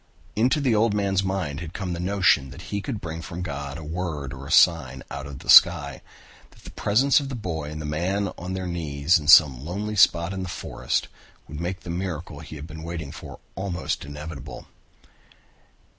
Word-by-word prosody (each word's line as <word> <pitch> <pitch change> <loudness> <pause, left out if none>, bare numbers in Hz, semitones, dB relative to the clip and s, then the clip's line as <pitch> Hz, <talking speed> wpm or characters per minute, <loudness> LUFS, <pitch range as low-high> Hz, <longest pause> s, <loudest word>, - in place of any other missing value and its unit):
Into 125 +8 +2
the 135 -5 +2
old 110 0 +2
man's 100 -2 +1
mind 95 -7 -2
had 85 0 -8
come 95 -3 -3
the 85 - -5
notion 90 -7 +2
that 70 - -11
now 90 - -10
he 100 +2 -4
could 115 -1 -4
bring 80 -1 -5
from 90 +1 -6
God 70 -3 -5
a 80 - -8
word 75 -4 -4
or 70 0 -9
a - - -7
sign 80 -6 +4
out 70 0 -6
of 70 -2 -8
the - - -13
sky, - - +6 0.5
that - - -21
the - - -10
presence 130 +8 +3
of 140 -2 -5
the 135 - -4
boy 80 -9 -4
and 75 0 -6
man 90 +7 -1
on 90 +2 -6
their 95 0 -3
knees 80 -1 +1
in 75 - -8
some 70 -4 +7
lonely 100 +6 -4
spot 85 -2 +4
in 95 - -4
the 95 - -5
forest - - -2 0.4
would 75 +1 -7
make 90 +2 -4
the 85 - -6
miracle 85 -2 -4
he - - -10
had 75 0 -8
been 80 0 -9
waiting 80 -3 -6
for 75 - -10 0.2
almost 95 -3 -3
inevitable. 75 -1 -8
85 Hz, 205 wpm, -24 LUFS, 75-95 Hz, 0.5 s, some